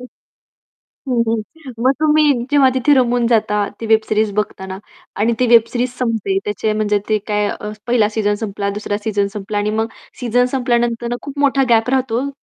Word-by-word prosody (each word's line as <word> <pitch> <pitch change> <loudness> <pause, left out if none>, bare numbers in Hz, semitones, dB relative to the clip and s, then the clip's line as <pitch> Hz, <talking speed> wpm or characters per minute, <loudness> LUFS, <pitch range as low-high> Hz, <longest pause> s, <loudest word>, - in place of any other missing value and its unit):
हं. 250 - -9 1.0
हं, 245 -2 +2
हं. 255 +6 -5
मग 260 - +5
तुम्ही 305 -1 +4 0.2
जेव्हा 285 -2 +5
तिथे 260 +3 +3
रमून 245 -2 +2
जाता 210 -3 +1
ती 225 - -4
वेब 220 0 +4
सीरीज 215 0 +1
बघताना 190 -2 -3 0.4
आणि 225 +3 +2
ती 250 - +3
वेब 230 -1 +6
सीरीज 245 +1 -1
संपते. 220 -6 0
त्याचे 210 +1 -1
म्हणजे 210 -1 +1
ते 215 -1 +2
काय 210 -1 0 0.4
पहिला 235 -3 +3
सीझन 210 -1 0
संपला, 200 -1 -3
दुसरा 205 0 -3
सीझन 205 -2 0
संपला 205 0 -4
आणि 205 +1 0
मग 225 - +1 0.3
सीझन 245 0 +2
संपल्यानंतर 240 -2 0
खूप 285 0 -8
मोठा 275 -1 +3
गॅप 230 +1 +3
राहतो, 260 0 0
230 Hz, 175 wpm, -18 LUFS, 210-250 Hz, 1.0 s, वेब